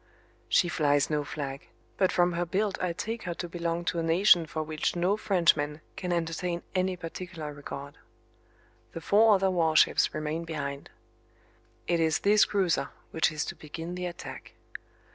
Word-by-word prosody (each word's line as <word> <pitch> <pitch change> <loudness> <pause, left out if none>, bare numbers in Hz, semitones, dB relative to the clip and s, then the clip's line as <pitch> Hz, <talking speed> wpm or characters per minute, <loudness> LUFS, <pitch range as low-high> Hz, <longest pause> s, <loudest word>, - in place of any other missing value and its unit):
She 175 - +4
flies 145 -3 +2
no 150 -1 +1
flag, 140 -2 -6 0.3
but 185 - +2
from 175 0 +2
her 175 +1 0
build 190 +3 -1
I 180 - 0
take 220 +7 -4
her 175 -2 -3
to 175 - -5
belong 170 0 -3
to 170 - 0
a - - -1
nation 170 0 +5
for 155 0 -3
which 155 +2 -2
no 180 +3 +2
Frenchman 170 -7 +2 0.2
can 180 -1 -4
entertain 170 +1 -2
any 185 0 +1
particular 165 -2 -7
regard. 140 0 -8 0.9
The 165 - -6
four 215 +5 +5
other 190 0 +2
warships 160 -3 +3
remain 155 +2 -3
behind. 140 -4 -5 1.0
It 170 -1 +1
is 160 -1 +2
this 205 +1 +5
cruiser 190 -5 0 0.2
which 160 - +2
is 155 -1 -2
to - - -5
begin 165 +3 -7
the 180 0 -3
attack. 175 - -9
170 Hz, 160 wpm, -28 LUFS, 155-180 Hz, 1.0 s, nation